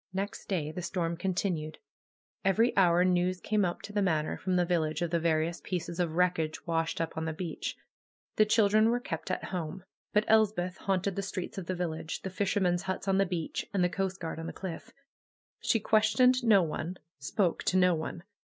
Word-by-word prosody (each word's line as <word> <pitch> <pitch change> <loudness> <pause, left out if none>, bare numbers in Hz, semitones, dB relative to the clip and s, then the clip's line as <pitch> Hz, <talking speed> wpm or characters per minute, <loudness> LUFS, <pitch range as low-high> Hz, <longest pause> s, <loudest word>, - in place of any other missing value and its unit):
Next 195 +2 -4
day 160 -6 -1
the 180 - -5
storm 170 -1 -2
continued. 175 -3 -2 0.7
Every 220 +5 +3
hour 180 -2 +5
news 180 0 +2
came 210 +1 +1
up 175 -2 -2
to 205 - -8
the 205 - +1
Manor 160 -5 +1
from 185 -1 -1
the 180 -1 +3
village 170 -1 0
of 170 - -2
the 170 - +2
various 165 +1 0
pieces 175 -2 -4
of 165 -3 0
wreckage 170 -3 +1
washed 165 -1 -1
up 165 0 -2
on 160 0 -2
the 160 - -2
beach. 165 +1 -4 0.6
The 215 - +5
chil 215 -1 +4
dren 215 +2 +4
were 240 +1 +2
kept 255 - -5
at - - -2
home. 180 0 -4 0.3
But 210 +1 +3
Elspeth 210 -5 +3
haunted 195 0 -1
the 200 - -1
streets 190 -1 -5
of 175 - -8
the 185 - -1
village, 165 -2 -4
the 190 - -4
fishermen's 185 -2 +1
huts 190 +1 -4
on 195 0 +3
the 195 - +3
beach, 175 -3 -3
and 185 - +3
the 180 - +3
coast 190 0 -2
guard 165 -2 -4
on 165 - -5
the - - -5
cliff. 190 +4 -6 0.7
She 225 - +2
questioned 235 +4 +4
no 210 -5 +6
one, 165 +3 -4 0.2
spoke 190 -5 0
to 185 - +2
no 180 -1 +5
one. 165 +1 -4
180 Hz, 205 wpm, -30 LUFS, 170-195 Hz, 0.7 s, no